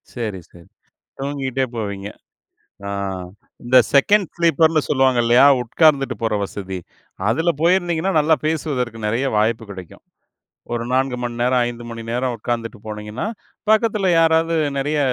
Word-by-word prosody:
சரி, 110 -6 -4
சரி. 85 -1 -17 0.5
தூங்கிட்டே 135 -1 -2
போவீங்க. 100 -2 -4 0.8
ஆ - - -4 0.7
இந்த 125 +2 +4 0.2
செகண்ட் 195 +7 +4
ஸ்லீப்பர்னு 165 -2 +3
சொல்வாங்க 130 -2 +3
இல்லையா? 120 +3 +5 0.2
உட்கார்ந்துட்டுப் 140 +2 +2
போற 110 -2 +1
வசதி, 95 -1 -6 0.5
அதுல 165 +2 +1
போயிருந்தீங்கன்னா 175 0 +2
நல்லா 155 +2 +3
பேசுவதற்கு 135 -7 -2
நெறைய 115 +5 0
வாய்ப்பு 110 +1 +1
கிடைக்கும். 95 -3 -11 0.7
ஒரு 115 -1 -2
4 130 0 +1
மணி 120 -1 -3
நேரம், 125 +1 +2
5 120 0 -7
மணி 115 0 -7
நேரம் 125 +1 -1
உட்கார்ந்துட்டுப் 115 -1 -4
போனீங்கன்னா, 105 - -5 0.4
பக்கத்துல 215 -2 +2
யாராவது 165 0 +3 0.2
நெறைய 145 +2 0
130 Hz, 125 wpm, -20 LUFS, 115-160 Hz, 0.8 s, இல்லையா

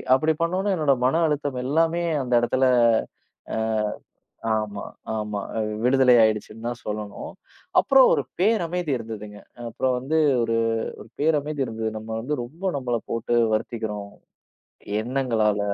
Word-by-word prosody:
அப்படி 155 +4 +2
பண்னோனே 185 +4 0
என்னோட 150 -3 +3
மன 160 +6 +2
அழுத்தம் 145 -3 -2
எல்லாமே 165 +5 +1 0.2
அந்த 125 -1 -3
இடத்துல 130 +2 +2 0.9
அ, - - -1 1.0
ஆமா, 105 -2 -2 0.3
ஆமா 105 -1 -3 0.4
விடுதலை 125 0 +5
ஆயிடுச்சுன்னு 110 +1 -1
தான் 120 0 -5
சொல்லணும். 105 -1 -5 0.5
அப்புறம், - - +6
ஒரு - - +1 0.2
பேரமைதி 180 -5 +1
இருந்ததுங்க. 105 -2 -8 0.3
அப்புறம், 130 +2 0
வந்து 140 +6 -1 0.3
ஒரு 115 0 0 0.4
ஒரு - - -12
பேரமைதி 150 -2 +1
இருந்தது. 110 -2 -3
நம்ம, 110 +1 -11
வந்து 145 +6 -2
ரொம்ப 155 +10 -12
நம்மள 125 -3 -1
போட்டு 115 +1 -1 0.2
வருத்திக்கிறோம் 110 -2 -3 0.9
எண்ணங்களால. 115 -4 +1
125 Hz, 120 wpm, -24 LUFS, 110-150 Hz, 1.0 s, அப்புறம்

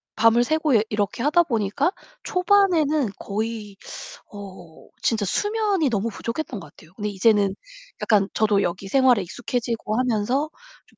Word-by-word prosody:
밤을 230 +2 +4
새고 310 0 +1 0.2
이렇게 210 +2 -2
하다보니까 295 - +2 0.3
초반에는 350 - +2
거의 210 -1 -4 0.5
어 190 -5 -11
진짜 220 -3 +1
수면이 410 - 0
너무 225 0 -1
부족했던 230 +2 -5
것 - - -11
같아요. 160 +3 -19
근데 210 0 -3
이제는 200 -1 +2 0.5
약간 200 -3 +3
저도 210 -2 +2
여기 180 +3 -3
생활에 250 -3 +4
익숙해지고 230 +2 -3
하면서 255 +4 0 0.4
좀 - - -28
225 Hz, 310 characters per minute, -23 LUFS, 205-290 Hz, 0.5 s, 밤을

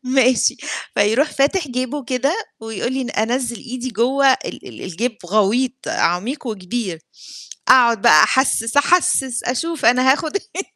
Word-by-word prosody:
"ماشي." 255 -2 +3 0.4
فيروح 225 +9 +2
فاتح 295 +4 0
جيبه 255 +3 -4
كده 260 +5 -1 0.3
ويقول 225 +2 -4
لي 265 0 -2
ن 240 - -5
أنزِّل 235 +2 -1
إيدي 255 +1 -6
جوّه 260 +4 +1
ال - - -6
ال - - -11
الجيب 220 +7 -3
غويط، 225 +7 0
عميق 225 - -1
وكبير. 195 -3 -4 0.7
أقعُد 235 -5 +5
بقى 235 - +7
أحسِّس، 235 -3 0
أحسِّس 285 -5 +2
أشوف 320 +6 -3
أنا 255 +3 +5
هاخُد 310 +6 -3
إيه 390 -2 -5
250 Hz, 140 wpm, -19 LUFS, 230-275 Hz, 0.7 s, بقى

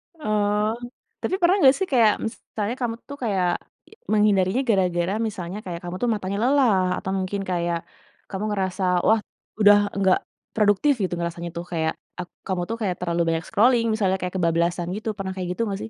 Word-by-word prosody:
Oh, 210 -5 +1 0.5
tapi 375 - 0
pernah 355 +3 +5
nggak 265 -4 +6
sih, 385 -1 -1
kayak 225 -5 +5
misalnya 220 0 -4
kamu 230 -2 -1
tuh 285 - -7
kayak 195 -5 +1 0.6
menghindarinya 210 +1 +3
gara-gara 180 -2 +2
misalnya 185 -2 -5
kayak 175 -2 -5
kamu 175 +1 -5
tuh 240 - +2
matanya 200 -1 -3
lelah, 250 -8 +4 0.2
atau 190 - -4
mungkin 190 +1 -2
kayak 170 -1 0 0.5
kamu 195 +1 -4
ngerasa, 190 -1 -2 0.2
wah, 220 0 +5 0.4
udah 205 0 +7 0.2
nggak 190 -1 +4 0.4
produktif 210 +7 +3
gitu, 180 - -1
ngerasanya 170 0 -4
tuh, 170 - -4
kayak 160 -2 0 0.3
ak 180 - -4 0.2
kamu 185 -2 -1
tuh 230 - -2
kayak 185 -4 0
terlalu 170 -1 -1
banyak 165 0 0
scrolling 230 +2 +3
misalnya, 195 -3 +1
kayak 180 -1 -3
kebablasan 170 0 +1
gitu 215 +1 -4
pernah 190 -1 -3
kayak 180 -2 -4
gitu 230 - -4
nggak, 195 0 -3
sih? - - -6
195 Hz, 175 wpm, -24 LUFS, 180-220 Hz, 0.6 s, udah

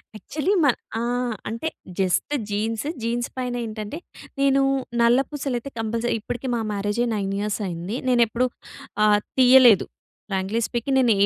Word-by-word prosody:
Actually 300 - -1
మా 285 - +6 0.3
ఆహ్ 240 0 -1
అంటే 230 +8 -3 0.3
జస్ట్ 190 +9 +1 0.2
జీన్స్. 220 +5 -2 0.2
జీన్స్ 240 +1 -1
పైన 250 -1 -2
ఏంటంటే 215 +4 -6 0.4
నేను 275 0 +4 0.4
నల్ల 235 +2 +5
పూసలైతే 275 -3 -3
కంపల్సరీ 225 +2 -1
ఇప్పటికి 245 +4 -5
మా 230 - -1
మ్యారేజ్ 205 +3 -1
9 195 -1 -2
ఇయర్స్ 210 +1 -2
అయింది. 175 +4 -4
నేనెప్పుడూ 240 0 +3 0.6
ఆహ్, 210 -1 +5 0.2
తీయలేదు. 250 -5 +7 0.4
ఫ్రాంక్లీ 195 +3 -1
స్పీకింగ్ 245 +3 -1
నేను 245 -3 +4
ఏ - - +6
235 Hz, 140 wpm, -23 LUFS, 210-250 Hz, 0.6 s, తీయలేదు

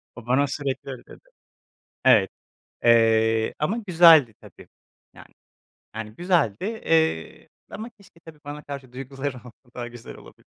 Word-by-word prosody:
O 120 -2 -11
bana 140 +3 +2
sürekli 140 -1 -4
öyle 130 - -9
dedi. - - -17 0.8
Evet, - - +5 0.5
eee, 115 -1 +3
ama 190 +10 -1
güzeldi 165 -9 +6
tabii, - - -16 0.5
yani. - - -16 0.6
Yani, 110 -1 -6
güzeldi, 170 - 0
eee, 160 - -1 0.2
ama 225 +3 -8
keşke 185 -4 -21
tabii 160 -1 -14
bana 145 +1 -8
karşı 140 -3 -9
duyguları 135 +1 -6
olsa 120 -1 -13 0.2
daha 120 -1 -6
güzel 120 -1 -11
olabilir. - - -17
135 Hz, 135 wpm, -24 LUFS, 120-160 Hz, 0.8 s, güzeldi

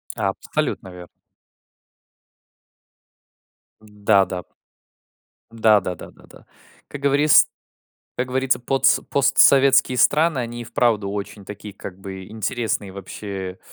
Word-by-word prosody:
Абсолютно 95 - -3
верно. 90 -1 -11 2.7
Да-да, 100 -3 0 1.1
да, 110 -2 +4
да, 90 -1 -4
да, - - -12
да, - - -20
да. - - -18 0.4
Как 145 - -8
говорис 140 +2 +5 0.7
как 125 +1 -2
говорится, 130 0 0
потс 135 +2 +2
постсоветские 135 -2 +4
страны, 155 -2 +3
они 120 0 -4
и - - -6
вправду 115 -4 0
очень 105 0 -6
такие, 105 0 -10
как 95 -1 -9
бы, 95 -1 -8
интересные, 110 -2 -3
вообще. 95 -1 -7
110 Hz, 105 wpm, -21 LUFS, 100-130 Hz, 2.7 s, говорис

